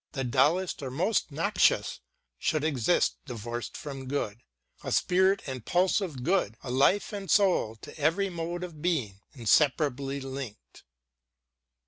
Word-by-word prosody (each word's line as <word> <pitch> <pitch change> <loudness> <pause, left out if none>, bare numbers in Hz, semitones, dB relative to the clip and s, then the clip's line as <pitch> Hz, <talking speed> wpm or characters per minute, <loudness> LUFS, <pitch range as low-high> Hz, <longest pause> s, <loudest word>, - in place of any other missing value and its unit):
The 135 -4 -2
dullest 150 +10 +2
or 135 - -4
most 170 - 0
noxious, 165 +9 +2 0.4
should 155 -3 0
exist 150 +1 +2
Divorc'd 120 0 -5
from 135 -3 -7
good, 120 -5 -3 0.4
a - - -4
spirit 190 +2 +3
and 130 -4 -5
pulse 185 - +2
of 150 -10 -5
good 170 - +1
A 130 - -5
life 140 +12 +3
and 200 -2 -5
soul, 185 - +3
to - - -10
every 165 +7 +2
mode 170 +1 -4
of 165 -4 -8
being 130 - -1
Inseparably 140 +2 +2
link'd. 135 -4 -8
145 Hz, 135 wpm, -28 LUFS, 130-180 Hz, 0.4 s, spirit